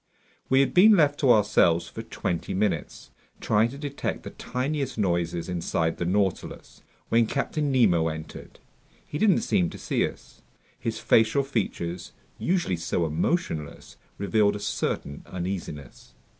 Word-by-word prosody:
We 130 +1 +5
had 135 - 0
been 205 +3 +7
left 145 -3 +3
to 135 -4 +4
ourselves 95 -6 +3
for - - -7
twenty 85 +2 -3
minutes, 100 +1 -2 0.3
trying 110 +2 +2
to 135 - -9
detect 145 -1 -4
the - - -7
tiniest 135 +1 -3
noises 85 -4 -1
inside 85 -2 -1
the 85 - -2
Nautilus, 95 0 -2 0.3
when 115 -1 +3
Captain 145 +2 -1
Nemo 95 -11 +3
entered. 80 -1 -7 0.5
He 150 - -5
didn't 210 -4 +4
seem 85 -2 +1
to - - -9
see - - 0
us. - - -14 0.4
His - - -3
facial 110 +5 +3
features, 90 -9 -3 0.3
usually 175 - 0
so 85 0 -1
emotionless, 80 - -2 0.2
revealed 100 0 +2
a - - -5
certain 70 -7 -3
uneasiness. 90 -6 -6
105 Hz, 140 wpm, -26 LUFS, 85-135 Hz, 0.5 s, been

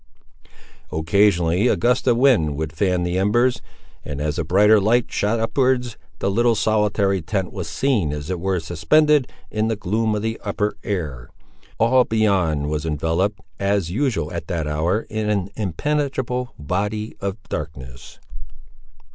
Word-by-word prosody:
Occasionally 85 +3 +2
a - - +3
gust 125 +2 +1
of 120 -2 +4
wind 110 - +3
would 75 -1 -3
fan 90 +1 0
the 90 +1 -1
embers; 120 +5 +2 0.4
and, 75 -2 -5
as 75 +2 -2
a - - 0
brighter 105 +6 +5
light 115 +4 +2
shot 105 +3 0
upwards, 125 0 +1 0.2
the 100 - -1
little 120 +3 +3
solitary 100 -2 +1
tent 95 +2 -3
was 90 -5 -5
seen 100 - 0
as 75 +3 -5
it 90 - -2
were 95 0 0
suspended 130 - +2 0.2
in 110 0 0
the 115 - 0
gloom 110 +2 0
of 105 - -3
the 110 0 -3
upper 105 0 -1
air. 75 -12 -4 0.5
All 125 +3 +4
beyond 95 -11 +1
was 75 0 -2
enveloped, 80 +6 -1 0.2
as 100 -3 0
usual 110 - -1
at 85 -2 -5
that 85 -4 -2
hour, 80 +8 0
in 110 -1 -3
an 100 -2 -1
impenetrable 125 - -2
body 105 +8 -3
of 100 0 -3
darkness. 65 -5 -7
100 Hz, 150 wpm, -21 LUFS, 80-115 Hz, 0.5 s, brighter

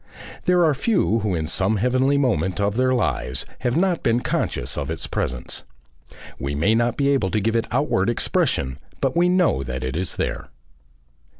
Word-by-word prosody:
There 180 -1 +4
are 155 - +3
few 140 - +1
who 105 -4 -1
in 80 -2 -1
some 95 +6 +1
heavenly 130 +5 +2
moment 110 -9 0
of 100 0 +1
their 130 +1 +2
lives 70 - -1
have 125 +2 0
not 180 -1 +1
been 120 +1 +2
conscious - - -2
of - - -3
its - - -3
presence. 65 -1 -3 0.8
We 70 +1 -3
may 85 +9 +2
not 120 +1 +1
be 140 -1 +2
able 135 -9 +2
to 110 - 0
give 110 +3 0
it 115 - +1
outward 120 -6 +1
expression, 70 - 0 0.2
but 135 +2 0
we 175 +1 +4
know 180 - +3
that 65 -1 -4
it 65 +2 -3
is 90 +1 -2
there." 65 -1 -3
115 Hz, 185 wpm, -22 LUFS, 80-135 Hz, 0.8 s, There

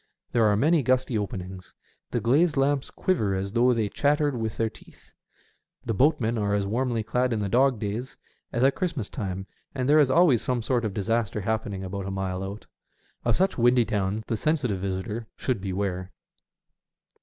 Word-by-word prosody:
There 115 -2 +3
are 105 -1 +3
many 155 +6 +3
gusty 130 -1 +1
openings. 95 -3 -5 0.3
The - - -1
glazed 150 +6 +2
lamps 135 0 +1
quiver 110 - 0
as 95 +1 -3
though 120 +3 +4
they 115 -3 +1
chattered 145 +5 +1
with 110 -2 -3
their 115 - +1
teeth. - - -15 0.7
The 115 - -1
boatmen 120 -2 +2
are 100 -1 +1
as 100 -1 0
warmly 115 +2 -1
clad 125 +3 0
in 110 - 0
the 100 - -1
dog 130 +4 +3
days 110 +5 -4 0.3
as 120 -1 0
at 135 +1 +5
Christmas 165 - -3
time, 95 -6 -4 0.3
and 130 -2 -1
there 150 +2 +6
is 145 -3 +4
always 145 -5 +4
some 125 -3 -1
sort 120 0 0
of 105 - -3
disaster 110 0 -1
happening 105 -2 -2
about 95 +1 -5
a - - -3
mile 95 -1 -3
out. 100 +3 -7 0.6
Of 120 -2 +3
such 190 -6 +1
windy 120 0 +4
towns 105 -1 -1
the 115 - -2
sensitive 130 -9 0
visitor 100 +4 -4
should 125 -7 -1
beware. 95 -1 -3
115 Hz, 180 wpm, -26 LUFS, 100-130 Hz, 0.7 s, there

